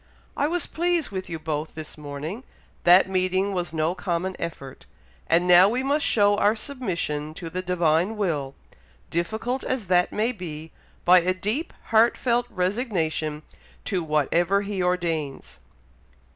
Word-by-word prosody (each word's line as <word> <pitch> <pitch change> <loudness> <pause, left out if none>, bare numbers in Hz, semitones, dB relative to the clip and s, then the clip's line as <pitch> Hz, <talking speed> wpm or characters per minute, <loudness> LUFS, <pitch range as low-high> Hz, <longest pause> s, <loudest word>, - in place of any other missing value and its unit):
I 290 - +1
was 345 0 0
pleased 345 -4 0
with 190 -1 -5
you 165 - -3
both 155 -1 -4
this 155 -1 -8
morning 150 - -6 0.4
that 180 +2 +7
meeting 185 +1 0
was 175 -3 -2
no 160 +1 0
common 180 0 -2
effort, 135 -5 -7 0.4
and 175 +2 +3
now 180 +2 +8
we 250 +4 -1
must 285 +2 +1
show 205 -2 +4
our 210 +2 +3
submission 170 - -3
to 165 -2 -7
the 185 - -2
Divine 180 +2 +1
will, 150 -9 -2 0.6
difficult 220 +9 -2
as 260 -5 -2
that 180 -1 +3
may 220 +3 0
be, 160 -7 -8 0.3
by 180 +1 +8
a 185 +2 0
deep, 215 - -2 0.2
heartfelt 235 +1 +3
resignation 180 - -1 0.4
to 185 -5 -1
whatever 165 +6 +1
He 200 -2 -3
ordains." 165 - -2
180 Hz, 145 wpm, -25 LUFS, 160-210 Hz, 0.6 s, now